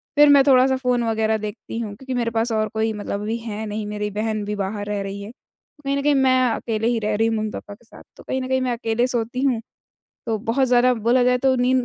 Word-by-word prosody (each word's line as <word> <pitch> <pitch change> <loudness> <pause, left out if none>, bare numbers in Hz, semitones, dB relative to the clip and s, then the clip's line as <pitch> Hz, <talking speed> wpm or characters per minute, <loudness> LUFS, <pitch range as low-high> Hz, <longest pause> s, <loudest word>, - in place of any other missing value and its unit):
फिर 295 0 +7
मैं 285 -1 +7
थोड़ा-सा 265 0 +5
फ़ोन 250 -2 0
वगैरह 220 -1 +1
देखती 215 +2 -6
हूँ 210 -3 -5
क्योंकि 260 +4 -6
मेरे 235 -2 -1
पास 230 +1 0
और 215 -1 +1
कोई 220 0 0
मतलब 205 -1 -4
अभी 220 +2 -2
है 220 -2 -5
नहीं, 210 0 -4
मेरी 210 0 -3
बहन 215 +1 -2
भी 210 +1 -3
बाहर 205 +1 -3
रह 205 -1 -2
रही 195 +1 -6
है। 205 +2 -8 0.5
कहीं 275 0 0
न - - -1
कहीं 295 0 +3
मैं 260 -1 +4
अकेले 225 0 -2
ही 235 -1 +1
रह 210 -1 -1
रही 225 +2 +2
हूँ 225 - 0
मम्मी-पापा 215 -1 -5
के 225 +4 -18
साथ। - - -15
तो - - -13
कहीं 260 - -2
न 255 - -4
कहीं 260 0 +1
मैं 255 -1 0
अकेले 230 0 0
सोती 240 0 -2
हूँ, 255 -5 +2 0.7
तो 225 -1 0
बहुत 230 +5 +1
ज़्यादा 250 +1 +4
बोला 235 +3 +2
जाए 250 0 +3
तो 265 +1 +2
नींद 250 0 +2
225 Hz, 255 wpm, -22 LUFS, 215-255 Hz, 0.7 s, फिर